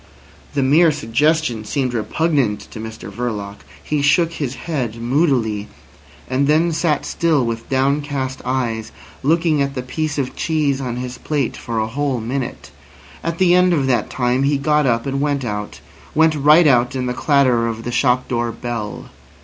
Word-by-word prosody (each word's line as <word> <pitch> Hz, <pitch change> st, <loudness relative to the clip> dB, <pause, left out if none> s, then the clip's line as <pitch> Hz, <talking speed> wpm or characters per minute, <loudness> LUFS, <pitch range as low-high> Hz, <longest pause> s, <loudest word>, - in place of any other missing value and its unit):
The 140 Hz, -, +2 dB
mere 155 Hz, +5 st, +5 dB
suggestion 140 Hz, -1 st, 0 dB
seemed 130 Hz, +2 st, -1 dB
repugnant 120 Hz, 0 st, 0 dB
to -, -, -8 dB
Mr 110 Hz, -2 st, -8 dB
Verloc. 105 Hz, -3 st, -4 dB, 0.3 s
He 150 Hz, -1 st, -1 dB
shook 165 Hz, +4 st, +3 dB
his 135 Hz, -5 st, -3 dB
head 130 Hz, -9 st, -3 dB
moodily, 120 Hz, -4 st, 0 dB, 0.6 s
and 135 Hz, +2 st, +1 dB
then 160 Hz, +3 st, +3 dB
sat 155 Hz, -2 st, 0 dB
still 160 Hz, -6 st, +1 dB
with 115 Hz, 0 st, -4 dB
downcast 135 Hz, 0 st, -1 dB
eyes, 120 Hz, -3 st, -2 dB, 0.3 s
looking 160 Hz, 0 st, +2 dB
at 140 Hz, 0 st, -1 dB
the 125 Hz, -, -3 dB
piece 155 Hz, +4 st, -3 dB
of 135 Hz, -3 st, -2 dB
cheese 145 Hz, -4 st, 0 dB
on 125 Hz, -3 st, -3 dB
his 125 Hz, 0 st, -5 dB
plate 145 Hz, -5 st, -1 dB
for 115 Hz, -1 st, -5 dB
a 110 Hz, -, +1 dB
whole 135 Hz, +2 st, -1 dB
minute. 125 Hz, +3 st, -4 dB, 0.5 s
At 165 Hz, 0 st, -2 dB
the 180 Hz, -1 st, +4 dB
end 180 Hz, 0 st, +4 dB
of 145 Hz, -5 st, +1 dB
that 130 Hz, -2 st, +1 dB
time 125 Hz, 0 st, 0 dB
he 140 Hz, +1 st, +2 dB
got 150 Hz, 0 st, +2 dB
up, 115 Hz, -1 st, +1 dB
and 135 Hz, 0 st, -2 dB
went 140 Hz, -2 st, 0 dB
out—went 120 Hz, +9 st, -1 dB
right 150 Hz, +3 st, +5 dB
out 125 Hz, -2 st, +3 dB
in 130 Hz, -1 st, -1 dB
the 125 Hz, -, -1 dB
clatter 130 Hz, -4 st, +2 dB
of 115 Hz, 0 st, -4 dB
the 120 Hz, -, -4 dB
shop 125 Hz, +1 st, +2 dB
door 120 Hz, -1 st, -1 dB
bell. 115 Hz, -3 st, -5 dB
135 Hz, 170 wpm, -19 LUFS, 120-150 Hz, 0.6 s, mere